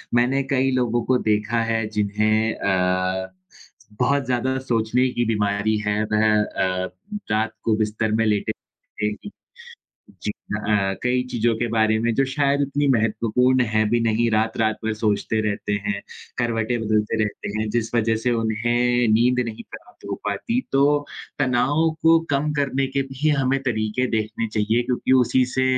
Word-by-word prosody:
मैंने 130 Hz, +3 st, +2 dB
कई 135 Hz, 0 st, +2 dB
लोगों 120 Hz, -1 st, 0 dB
को 130 Hz, -, +4 dB
देखा 105 Hz, +2 st, +1 dB
है 115 Hz, -1 st, 0 dB
जिन्हें 110 Hz, +2 st, +1 dB
अ, 95 Hz, 0 st, 0 dB, 0.7 s
बहुत 140 Hz, +2 st, +2 dB
ज़्यादा 130 Hz, +1 st, 0 dB
सोचने 115 Hz, +3 st, +2 dB
की 120 Hz, -, +1 dB
बीमारी 105 Hz, -1 st, 0 dB
है, 105 Hz, +1 st, +1 dB
वह 110 Hz, +1 st, +3 dB, 0.2 s
अ, 95 Hz, -2 st, -2 dB, 0.4 s
रात 110 Hz, +1 st, 0 dB
को 110 Hz, -, +2 dB
बिस्तर 105 Hz, +1 st, -2 dB
में 115 Hz, +1 st, +2 dB
लेटे-लेटे 105 Hz, 0 st, -4 dB, 0.2 s
ही 205 Hz, -, -7 dB, 0.9 s
जी 105 Hz, -, -1 dB
अ 105 Hz, -, -6 dB
अ, 100 Hz, -2 st, +2 dB
कई 125 Hz, 0 st, +1 dB
चीज़ों 115 Hz, -1 st, +1 dB
के 120 Hz, +1 st, -1 dB
बारे 110 Hz, -1 st, +2 dB
में 115 Hz, +1 st, 0 dB
जो 135 Hz, -, +3 dB
शायद 140 Hz, 0 st, +1 dB
इतनी 140 Hz, +1 st, 0 dB
महत्वपूर्ण 115 Hz, +4 st, +2 dB
है 110 Hz, -, +3 dB
भी 120 Hz, +1 st, +2 dB
नहीं, 115 Hz, +1 st, +1 dB
रात-रात 110 Hz, 0 st, +1 dB
भर 110 Hz, -, 0 dB
सोचते 110 Hz, 0 st, 0 dB
रहते 100 Hz, 0 st, -3 dB
हैं, 100 Hz, -1 st, -2 dB, 0.4 s
करवटें 120 Hz, 0 st, -1 dB
बदलते 110 Hz, 0 st, 0 dB
रहते 105 Hz, -, -5 dB
हैं 110 Hz, -, -2 dB
जिस 115 Hz, 0 st, -2 dB
वजह 115 Hz, -1 st, +2 dB
से 125 Hz, -, +3 dB
उन्हें 120 Hz, +2 st, +1 dB
नींद 125 Hz, +3 st, +3 dB
नहीं 110 Hz, -1 st, -7 dB
प्राप्त -, -, -13 dB
हो -, -, -2 dB
पाती। 165 Hz, -, -1 dB
तो 135 Hz, 0 st, +3 dB, 0.6 s
तनाव 140 Hz, +4 st, +2 dB
को 165 Hz, 0 st, +6 dB
कम 145 Hz, +2 st, 0 dB
करने 135 Hz, -2 st, 0 dB
के 135 Hz, +1 st, -1 dB
भी 135 Hz, +3 st, -1 dB
हमें 135 Hz, +1 st, +1 dB
तरीके 110 Hz, 0 st, -1 dB
देखने 110 Hz, 0 st, -1 dB
चाहिए 110 Hz, +3 st, +1 dB
क्योंकि 125 Hz, +1 st, -1 dB
उसी 130 Hz, +2 st, +2 dB
से 130 Hz, -, +1 dB
115 Hz, 160 wpm, -22 LUFS, 110-125 Hz, 0.9 s, को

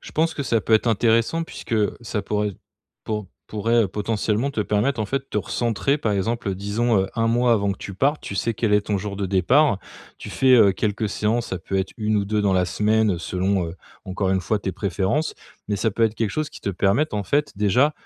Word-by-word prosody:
Je -, -, -12 dB
pense 160 Hz, +1 st, +1 dB
que 140 Hz, -, -3 dB
ça 115 Hz, -4 st, +1 dB
peut 110 Hz, -, -2 dB
être 110 Hz, -, +2 dB
intéressant 115 Hz, +7 st, +2 dB
puisque, 165 Hz, -, -9 dB
heu, 105 Hz, -2 st, +1 dB
ça 110 Hz, -3 st, -3 dB
pourrait 105 Hz, +1 st, -1 dB, 0.5 s
pou 105 Hz, -2 st, -3 dB, 0.2 s
pourrait, 115 Hz, +2 st, +1 dB
heu, 100 Hz, -, -1 dB
potentiellement 105 Hz, +5 st, -1 dB
te 110 Hz, -, -1 dB
permettre, 105 Hz, +5 st, 0 dB
en 105 Hz, -, -1 dB
fait, 135 Hz, +4 st, -3 dB
te -, -, -4 dB
recentrer, 115 Hz, +7 st, 0 dB
par 110 Hz, -6 st, 0 dB
exemple, 110 Hz, +2 st, -1 dB
heu, -, -, -2 dB
disons, 105 Hz, +3 st, 0 dB
heu, 95 Hz, -, -1 dB
1 115 Hz, 0 st, +2 dB
mois 120 Hz, +1 st, +3 dB
avant 100 Hz, -3 st, +1 dB
que -, -, -10 dB
tu 95 Hz, -, -7 dB
partes, 140 Hz, +9 st, +1 dB
tu 100 Hz, -, -5 dB
sais 115 Hz, +3 st, 0 dB
quel 110 Hz, 0 st, 0 dB
est 105 Hz, 0 st, +4 dB
ton 105 Hz, 0 st, -1 dB
jour 100 Hz, 0 st, -4 dB
de 100 Hz, -1 st, -2 dB
départ, 100 Hz, -, +3 dB, 0.4 s
tu -, -, -8 dB
fais, 130 Hz, -1 st, +4 dB
heu, 110 Hz, -5 st, +7 dB
quelques 105 Hz, +2 st, -1 dB
séances, 110 Hz, +3 st, -1 dB
ça 95 Hz, -, -3 dB
peut 95 Hz, +3 st, -4 dB
être 95 Hz, 0 st, -1 dB
1 110 Hz, -1 st, 0 dB
ou 100 Hz, -, +1 dB
2 105 Hz, +1 st, 0 dB
dans 100 Hz, -1 st, +2 dB
la 90 Hz, -1 st, +3 dB
semaine, 110 Hz, +3 st, +2 dB
heu, -, -, -5 dB
selon, 95 Hz, +1 st, -1 dB
heu, 80 Hz, -, -8 dB, 0.3 s
encore 95 Hz, 0 st, -1 dB
une 95 Hz, 0 st, +2 dB
fois, 105 Hz, +4 st, -1 dB
tes 95 Hz, -, -2 dB
préférences, 100 Hz, -, -1 dB, 0.3 s
mais 105 Hz, -, -1 dB
ça 110 Hz, +3 st, 0 dB
peut 115 Hz, +3 st, +1 dB
être 110 Hz, -1 st, 0 dB
quelque 110 Hz, -2 st, -1 dB
chose 155 Hz, +7 st, -2 dB
qui -, -, -12 dB
te 100 Hz, -, -2 dB
permette, 100 Hz, -, +1 dB
en 105 Hz, -2 st, -2 dB
fait, 145 Hz, +6 st, 0 dB
déjà 115 Hz, +9 st, +3 dB
105 Hz, 245 wpm, -23 LUFS, 100-115 Hz, 0.5 s, heu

